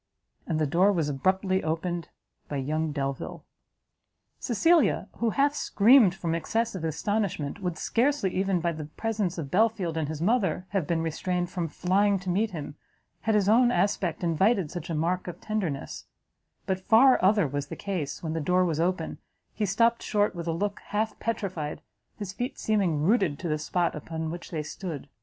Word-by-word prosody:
And 160 Hz, -, 0 dB
the 155 Hz, -, +2 dB
door 180 Hz, +8 st, +4 dB
was 165 Hz, -6 st, 0 dB
abruptly 185 Hz, +6 st, +1 dB
opened 165 Hz, +2 st, -2 dB, 0.4 s
by 145 Hz, -, -2 dB
young 155 Hz, +3 st, -1 dB
Delvile! 135 Hz, -2 st, -4 dB, 0.9 s
Cecilia, 260 Hz, -, +3 dB
who 230 Hz, -, +1 dB
half 280 Hz, +5 st, +2 dB
screamed 220 Hz, -6 st, +5 dB
from 170 Hz, -3 st, -2 dB
excess 225 Hz, +7 st, -1 dB
of 185 Hz, -4 st, -5 dB
astonishment, 165 Hz, 0 st, -2 dB
would 180 Hz, -3 st, -2 dB
scarcely, 245 Hz, -5 st, +1 dB
even 190 Hz, -2 st, +1 dB
by 170 Hz, 0 st, +1 dB
the 155 Hz, -2 st, -6 dB
presence 205 Hz, +2 st, -2 dB
of 145 Hz, -5 st, -5 dB
Belfield 195 Hz, -5 st, +1 dB
and 155 Hz, -2 st, -1 dB
his 155 Hz, 0 st, -5 dB
mother, 190 Hz, -2 st, +1 dB
have 195 Hz, -7 st, -1 dB
been 165 Hz, -1 st, 0 dB
restrained 175 Hz, +2 st, -2 dB
from 175 Hz, -3 st, -2 dB
flying 195 Hz, +5 st, +2 dB
to 185 Hz, -1 st, -3 dB
meet 210 Hz, +5 st, +1 dB
him, 150 Hz, -5 st, -7 dB, 0.4 s
had 220 Hz, -1 st, 0 dB
his 200 Hz, -2 st, +2 dB
own 240 Hz, +3 st, +5 dB
aspect 180 Hz, -4 st, 0 dB
invited 175 Hz, +1 st, +2 dB
such 175 Hz, -, -6 dB
a 165 Hz, -, -1 dB
mark 175 Hz, +4 st, -1 dB
of 175 Hz, -, -6 dB
tenderness; 190 Hz, -10 st, -3 dB, 0.6 s
but 190 Hz, -1 st, -1 dB
far 230 Hz, +6 st, +5 dB
other 200 Hz, -3 st, +4 dB
was 145 Hz, +1 st, -3 dB
the -, -, -6 dB
case; 180 Hz, -9 st, -4 dB
when 160 Hz, -1 st, -2 dB
the 165 Hz, -, -2 dB
door 180 Hz, +4 st, +2 dB
was 160 Hz, -3 st, -1 dB
open, 180 Hz, +3 st, -1 dB, 0.3 s
he 210 Hz, -, -1 dB
stopt 230 Hz, +5 st, +2 dB
short 205 Hz, -1 st, +1 dB
with 170 Hz, -2 st, -6 dB
a -, -, +1 dB
look 200 Hz, +5 st, -2 dB
half 215 Hz, +2 st, -2 dB
petrified, 185 Hz, -9 st, -3 dB, 0.4 s
his 200 Hz, -3 st, -5 dB
feet 245 Hz, +6 st, -4 dB
seeming 185 Hz, -9 st, +1 dB
rooted 190 Hz, -6 st, +2 dB
to 175 Hz, -, -5 dB
the 155 Hz, -1 st, 0 dB
spot 175 Hz, +3 st, 0 dB
upon 160 Hz, +1 st, -5 dB
which 175 Hz, +1 st, -7 dB
they 155 Hz, -3 st, -3 dB
stood. 155 Hz, -3 st, -6 dB
180 Hz, 180 wpm, -27 LUFS, 160-205 Hz, 0.9 s, screamed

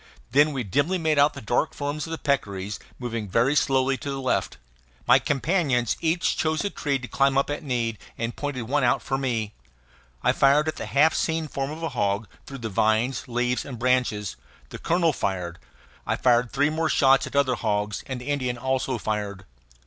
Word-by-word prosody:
Then 145 Hz, +4 st, +5 dB
we 135 Hz, -3 st, -2 dB
dimly 145 Hz, -, +1 dB
made 160 Hz, -3 st, +1 dB
out 145 Hz, +1 st, +4 dB
the 140 Hz, -, -7 dB
dark 120 Hz, +8 st, 0 dB
forms 145 Hz, +2 st, -3 dB
of -, -, -8 dB
the 165 Hz, -, -2 dB
peccaries 100 Hz, -10 st, -2 dB, 0.2 s
moving 115 Hz, -4 st, -4 dB
very 120 Hz, +9 st, +2 dB
slowly 135 Hz, -2 st, +2 dB
to 140 Hz, -, -6 dB
the 135 Hz, -1 st, -3 dB
left. 130 Hz, -1 st, -1 dB, 0.5 s
My 125 Hz, +2 st, +6 dB
companions 135 Hz, -, +1 dB
each 170 Hz, +1 st, +1 dB
chose 155 Hz, +3 st, 0 dB
a 200 Hz, -, -1 dB
tree 140 Hz, -2 st, -1 dB
to 125 Hz, -1 st, -8 dB
climb 135 Hz, +1 st, +2 dB
at 145 Hz, +2 st, 0 dB
need 120 Hz, -6 st, -2 dB, 0.2 s
and 115 Hz, +1 st, -3 dB
pointed 145 Hz, -4 st, -3 dB
out -, -, -9 dB
one 135 Hz, -4 st, +2 dB
for 135 Hz, 0 st, -2 dB
me. 115 Hz, -5 st, -2 dB, 0.7 s
I -, -, +4 dB
fired 140 Hz, +3 st, +4 dB
at 155 Hz, -, -2 dB
the -, -, -5 dB
half 155 Hz, +3 st, +4 dB
seen 160 Hz, -1 st, -1 dB
form 135 Hz, -1 st, -3 dB
of 160 Hz, +2 st, -7 dB
a 165 Hz, -, -1 dB
hog, 105 Hz, -4 st, -1 dB, 0.2 s
through 140 Hz, -, -7 dB
the -, -, +1 dB
vines, 110 Hz, +6 st, +1 dB
leaves, 125 Hz, +1 st, 0 dB
and 130 Hz, -4 st, -7 dB
branches; 120 Hz, -, 0 dB, 0.3 s
the -, -, -8 dB
colonel 170 Hz, -1 st, +2 dB
fired; 90 Hz, -6 st, -3 dB, 0.5 s
I -, -, +1 dB
fired 120 Hz, -1 st, +2 dB
three 145 Hz, +2 st, +2 dB
more 160 Hz, 0 st, 0 dB
shots 135 Hz, -2 st, +4 dB
at -, -, -9 dB
other 140 Hz, -2 st, +3 dB
hogs; 105 Hz, -3 st, -1 dB
and 130 Hz, -2 st, -4 dB
the 125 Hz, +3 st, -7 dB
Indian 130 Hz, -4 st, -1 dB
also 130 Hz, 0 st, -1 dB
fired. 105 Hz, -3 st, -3 dB
130 Hz, 195 wpm, -25 LUFS, 115-145 Hz, 0.7 s, My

